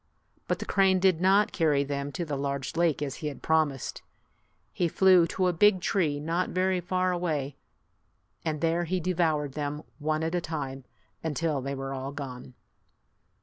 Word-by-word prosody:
But - - 0
the - - -6
crane 190 -1 +3
did 180 -3 +3
not 200 +3 +4
carry 150 -5 +2
them 140 0 -3
to 175 - -3
the 150 -2 -3
large 140 -1 -3
lake 165 -3 +2
as 140 -1 -4
he 155 - -4
had 145 - -7
promised. 155 -5 0 0.7
He 175 - +1
flew 185 0 +5
to 185 +2 -1
a 180 - +2
big 200 +3 +5
tree 165 -6 0
not 165 +4 -1
very 185 0 +1
far 185 +1 0
away, 155 -6 -2 0.9
and 155 -2 -2
there 170 +1 +1
he 185 +2 -1
devoured 160 -5 0
them 150 +1 -4 0.2
one 155 +1 -1
at 165 +1 -1
a 175 - +1
time, 135 -5 -5 0.4
until 160 -2 -1
they 135 +1 -3
were 135 0 -4
all 135 +1 -4
gone. 130 -3 -8
160 Hz, 175 wpm, -28 LUFS, 145-180 Hz, 0.9 s, flew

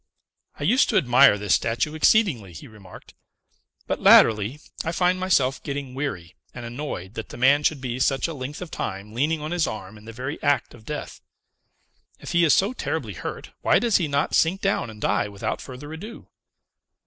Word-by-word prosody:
"I - - -4
used 235 - +3
to 215 - +2
admire 130 - +5
this 105 -1 0
statue 120 +7 0
exceedingly," 155 - +2
he 80 - -10
remarked, 105 -5 -14 0.7
"but, - - -3
latterly, 110 +5 +5 0.2
I 165 - -2
find 180 +2 +1
myself 135 -9 +1
getting 140 -2 -5
weary 110 - -5 0.2
and 120 -1 -7
annoyed 115 -6 -6
that 115 - -7
the - - -9
man 135 +4 +4
should 150 -1 +1
be 125 -1 -4
such 135 +3 +1
a 165 - -5
length 145 +4 -6
of 175 - -11
time 100 +3 -5
leaning 150 +6 0
on 155 +2 -5
his 175 -2 +1
arm 105 0 -7
in 105 - -17
the 115 - -8
very 130 +6 -6
act 145 -1 +1
of 110 -2 -16
death. 150 +3 -6 1.0
If - - -8
he 175 0 +3
is 155 - +5
so 200 +6 +1
terribly - - -4
hurt, - - -7
why - - +4
does 235 -4 +2
he 170 - -1
not 140 0 -1
sink 175 +4 +2
down 195 - 0
and 110 -1 -11
die 105 - 0
without 100 -1 -4
further 140 +4 -9
ado? 210 +9 -9
140 Hz, 195 wpm, -24 LUFS, 115-160 Hz, 1.0 s, admire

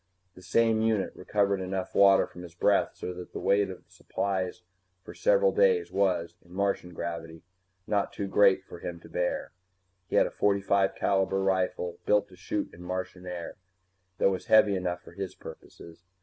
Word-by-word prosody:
The 90 - -15
same 110 +4 +2
unit 110 -3 0
recovered 100 0 0
enough 95 0 -4
water 100 -1 +6
from 90 - -12
his 85 -1 -11
breath 100 +3 +2
so 90 - -5
that 90 0 -10
the - - -4
weight 100 0 +2
of 95 - -9
supplies 95 -2 -3 0.4
for - - -10
several - - +3
days 465 -3 +3
was, 90 -4 +1
in 85 - -21
Martian 100 -1 -1
gravity, 80 -1 -6 0.4
not 100 -1 0
too 100 - -4
great 95 -1 +4
for 85 - -11
him 85 0 -6
to - - -14
bear. 90 +2 -2 0.6
He - - -3
had - - +5
a - - -4
.45 100 -1 +1
rifle 95 -2 -1
built 105 0 +3
to 95 - -15
shoot 95 +3 -4
in 85 - -13
Martian 90 0 -5
air, 90 +1 -6 0.6
that 95 - +3
was 95 - -4
heavy 105 -2 +5
enough 90 -1 -3
for - - -13
his 95 -2 -6
purposes. 85 0 -12
95 Hz, 175 wpm, -28 LUFS, 90-100 Hz, 0.6 s, water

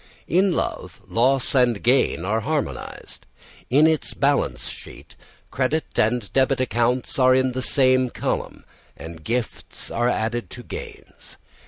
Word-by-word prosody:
In 185 0 +2
love, - - -4
loss 130 +3 +1
and 125 -5 +2
gain 120 -8 +2
are 110 +4 0
harmonised. 150 +5 -5 0.4
In 145 +5 +5
its 160 -1 0
balance 140 0 0
sheet, - - -11 0.4
credit 135 +4 0
and 110 -1 0
debit 135 0 +2
accounts 125 +1 0
are 130 0 +5
in 130 0 +2
the 130 +1 -3
same 130 -1 +3
column, - - -4 0.3
and 80 -1 -10
gifts 120 +3 -4
are 120 +1 +1
added 120 0 -2
to 120 - -10
gains. - - -10
130 Hz, 135 wpm, -23 LUFS, 120-135 Hz, 0.4 s, In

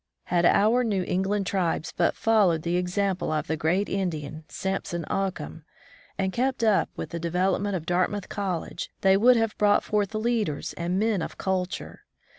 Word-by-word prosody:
Had 175 -1 +1
our 225 +5 +4
New 200 -5 0
England 195 +3 0
tribes 175 -4 -1
but 170 - +2
followed 200 -8 +3
the 170 +1 0
example 180 0 0
of 155 -1 -1
that 160 - -2
great 175 +7 +1
Indian, 160 -5 -3
Samson 190 -3 -3
Occum, 185 -5 -3 0.6
and 190 -1 -1
kept 255 0 0
up 215 -3 +3
with - - -6
the 170 - -4
development 185 +4 0
of 165 -3 -4
Dartmouth 185 +3 0
College, 185 -4 -4
they 190 0 +5
would 240 +5 +5
have 225 -2 0
brought 205 -1 +4
forth 210 0 -1
leaders 215 -8 -1
and 175 +2 -2
men 215 -2 +1
of - - -6
culture. 185 -1 -3
190 Hz, 165 wpm, -26 LUFS, 175-205 Hz, 0.6 s, they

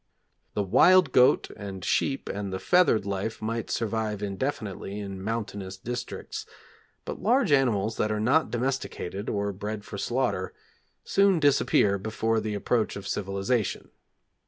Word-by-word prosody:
The 105 - +1
wild 155 - +5
goat 125 0 +4
and 95 -3 -7
sheep 135 - 0
and 100 -1 -4
the 95 - -2
feathered 140 - +3
life 100 +2 -3
might 115 +1 -3
survive 110 -2 -2
indefinitely 105 -2 -3
in 100 -2 -6
mountainous 100 -3 -4
districts, 120 +5 -6 0.6
but - - -6
large 235 - +3
animals 115 -6 +2
that 105 - 0
are 105 - -1
not 130 +9 +3
domesticated, 120 -6 -3
or 100 -1 -1
bred 105 +2 -5
for 100 - -7
slaughter, 120 -7 -1 0.5
soon 195 -3 +3
disappear 135 -8 +3
before 110 +2 0
the 105 -1 -3
approach 110 +2 0
of 100 - -7
civilisation. 100 +3 -1
110 Hz, 135 wpm, -27 LUFS, 100-125 Hz, 0.6 s, wild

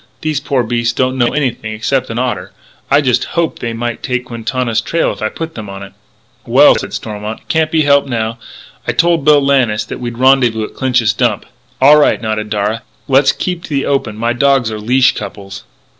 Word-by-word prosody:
These 155 -2 -1
poor 135 -3 0
beasts 120 0 -1
don't 130 +1 0
know 120 - +3
anything 120 -6 -2
except 130 +4 -1
an 115 - -4
otter. 125 0 -2 0.4
I 140 +1 +4
just 125 -4 +1
hoped 170 -1 0
they 115 - -3
might 120 0 -4
take 125 -1 -2
Quintana's 115 -1 -2
trail 165 +7 0
if - - -9
I - - 0
put 165 0 -6
them 105 -3 -8
on 100 0 -8
it." 100 - -12 0.5
"Well," - - +6
said - - -4
Stormont, 105 0 -5
"it - - -32
can't 160 -1 +1
be 155 -1 +2
helped 140 -1 +3
now.... 115 -1 -2 0.5
I - - +1
told 170 -3 +2
Bill 150 -1 +6
Lannis 120 -6 +2
that - - -7
we'd 120 -1 -5
rendezvous 125 -4 +3
at - - -7
Clinch's 125 -6 +1
Dump." - - 0 0.3
"All 145 +3 +7
right," 150 - +3
nodded 110 -2 -3
Darragh. 105 +2 -1 0.3
"Let's 135 0 +4
keep 180 -2 -4
to - - -12
the 140 -2 -1
open; 120 -6 -1
my 115 +2 0
dogs 135 -2 +2
are 110 - -5
leashed 125 +4 +2
couples." 95 -2 -8
120 Hz, 205 wpm, -15 LUFS, 110-140 Hz, 0.5 s, All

